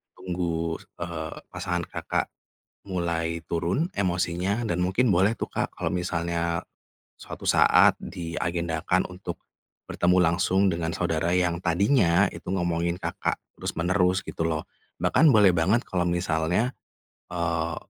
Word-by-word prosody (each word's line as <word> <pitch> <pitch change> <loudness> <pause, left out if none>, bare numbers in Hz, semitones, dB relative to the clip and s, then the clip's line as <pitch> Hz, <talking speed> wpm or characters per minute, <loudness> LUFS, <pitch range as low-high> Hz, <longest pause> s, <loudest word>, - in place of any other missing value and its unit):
tunggu, 85 -2 -2
s - - -17 0.2
eee, - - -4 0.2
pasangan 90 0 -2
Kakak - - -2 0.6
mulai 85 -2 -2
turun 85 - 0
emosinya, 90 +3 0
dan 90 -4 -1
mungkin 95 +5 +2
boleh 100 +6 +3
tuh, - - -3
Kak, - - -3
kalau 80 - -1
misalnya 85 -1 -1 0.5
suatu - - -9
saat - - +6
diagendakan 85 0 -1
untuk 90 +1 -7 0.5
bertemu 90 +1 +2
langsung 90 +4 +2
dengan 85 -1 -2
saudara 85 0 0
yang 90 -2 +1
tadinya 95 0 +3
itu - - -11
ngomongin 85 -2 0
Kakak - - -2 0.2
terus-menerus, 90 +2 +1
gitu 80 - -3
loh. 80 -1 -1 0.4
Bahkan 160 - +4
boleh 105 -3 +6
banget 100 +10 +2
kalau 90 -2 -1
misalnya, 90 +6 0 0.6
eee, 85 -1 -1
85 Hz, 125 wpm, -26 LUFS, 85-95 Hz, 0.6 s, saat